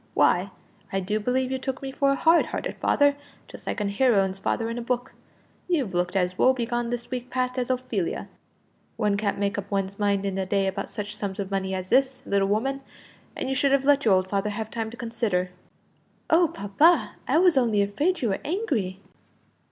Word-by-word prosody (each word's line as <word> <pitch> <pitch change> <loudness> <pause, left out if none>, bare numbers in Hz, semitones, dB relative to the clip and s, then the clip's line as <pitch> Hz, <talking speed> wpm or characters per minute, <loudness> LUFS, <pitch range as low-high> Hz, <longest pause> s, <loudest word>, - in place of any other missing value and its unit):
Why, - - +3 0.4
I 195 - 0
do 210 +3 -1
believe 255 +4 0
you 265 - -1
took 265 0 -4
me 270 - -4
for 275 +1 +2
a - - +2
hard 330 +4 +4
hearted - - -4
father, 285 -1 +3 0.3
just - - -13
like - - -2
a 210 - -1
heroine's 200 -3 +2
father 225 +3 -1
in 230 +1 -3
a - - -4
book. 245 +1 -2 0.5
You've 285 - 0
looked 175 +1 -1
as 180 -1 0
woe 260 - +5
begone 240 -1 -2
this 240 +1 -4
week 250 0 -4
past 255 0 -1
as 245 - -2
Ophelia. 245 -8 -2 0.7
One 210 -2 +1
can't 200 0 -1
make 200 +1 -1
up 200 0 -8
one's 195 0 -2
mind 200 -1 +1
in 195 -1 -2
a 190 - -1
day 195 0 +1
about 195 +1 -3
such 210 0 -5
sums 200 -1 -4
of 195 -1 -4
money 190 -1 -1
as 185 0 -5
this, 265 +1 +2
little 200 -1 +1
woman; 265 +7 0 0.5
and - - -3
you 265 - 0
should 275 0 +2
have 275 -1 +2
let 285 0 +4
your 210 -4 +5
old 185 0 +1
father 200 +2 -1
have 215 +1 -5
time 225 -1 -3
to 235 - -11
consider." 220 -6 -1 0.8
"Oh, 335 +2 +5
papa; 205 - +3
I - - +3
was 355 0 +5
only 225 -6 +3
afraid 290 - 0
you 230 - +2
were 195 - -1
angry." 265 - -2
225 Hz, 210 wpm, -25 LUFS, 195-260 Hz, 0.8 s, woe